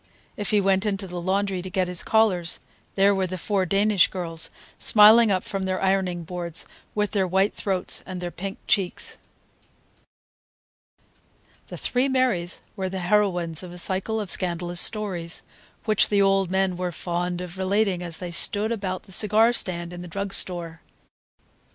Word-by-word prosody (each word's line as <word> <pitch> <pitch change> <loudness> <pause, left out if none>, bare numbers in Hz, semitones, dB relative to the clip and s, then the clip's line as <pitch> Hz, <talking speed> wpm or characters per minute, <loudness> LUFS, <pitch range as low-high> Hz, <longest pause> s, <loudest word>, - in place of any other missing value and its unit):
If 205 -4 -4
he 210 - +3
went 195 0 +2
into 195 -1 -2
the 180 -1 -6
laundry 190 +1 -1
to 185 - -7
get 185 0 0
his 180 -1 0
collars, 195 -6 +1 0.4
there 200 +1 +4
were 190 -1 0
the 185 +1 -5
four 190 +1 -1
Danish 200 +1 +3
girls, 165 -3 -2 0.3
smiling 220 +2 +6
up 190 -2 +1
from 195 -1 -4
their 185 0 -1
ironing 190 -3 0
boards, 170 0 -3 0.3
with 210 -1 0
their 195 -3 +1
white 190 +3 +1
throats 190 -3 -1
and 185 -1 -7
their 175 -1 -4
pink 195 +3 -6
cheeks. 190 -3 0 2.5
The - - -8
three 255 +2 0
Marys 250 -10 0
were 190 -1 -3
the 190 - -5
heroines 175 -4 +1
of 180 -2 -9
a 175 - -10
cycle 190 +5 -1
of 205 -4 -4
scandalous 175 -1 0
stories, 185 -6 -2 0.4
which 215 -3 +3
the 205 - +2
old 195 -2 +3
men 190 -1 0
were 180 -1 -2
fond 175 +1 -3
of 180 +1 -8
relating 195 -1 +1
as 170 -2 0
they 180 -1 -6
sat 205 +5 +5
about 195 -5 -3
the 195 - -17
cigar 215 +4 +4
stand 175 -5 -1
in 175 - -8
the 180 - -8
drug 200 +3 -4
store. 170 -3 -1
190 Hz, 170 wpm, -24 LUFS, 175-200 Hz, 2.5 s, smiling